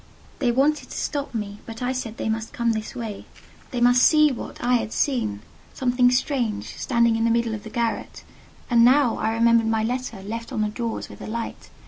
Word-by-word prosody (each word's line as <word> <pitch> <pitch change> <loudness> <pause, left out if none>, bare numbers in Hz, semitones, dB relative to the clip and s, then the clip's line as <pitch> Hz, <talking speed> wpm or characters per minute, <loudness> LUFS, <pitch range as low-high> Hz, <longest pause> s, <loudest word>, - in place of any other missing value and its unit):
They 250 -4 +2
wanted 285 +5 +1
to - - -7
stop 285 -4 -3
me, 205 -2 -4
but 225 +2 -7
I 250 - 0
said 240 -4 -4
they - - -3
must 220 0 -2
come 235 -1 +1
this 220 -1 -4
way: 225 -4 -6 0.4
they 250 - -3
must 245 +1 +5
see 305 0 +6
what 245 - -6
I 245 +1 +1
had 220 - -4
seen—something 245 - 0
strange, 245 -4 -1
standing 235 -2 +2
in 225 - 0
the 230 - +3
middle 230 -1 +1
of 215 - -5
the 220 - -8
garret. 235 0 -3 0.4
And, 235 -2 +5
now, 255 0 +5
I 220 - 0
remembered 230 0 +3
my 225 -1 +1
letter, 240 -4 -3
left 230 +3 -6
on 215 - 0
the 210 - 0
drawers 230 +1 -4
with - - -12
the - - -7
light. 230 +1 -5
235 Hz, 205 wpm, -24 LUFS, 225-250 Hz, 0.4 s, see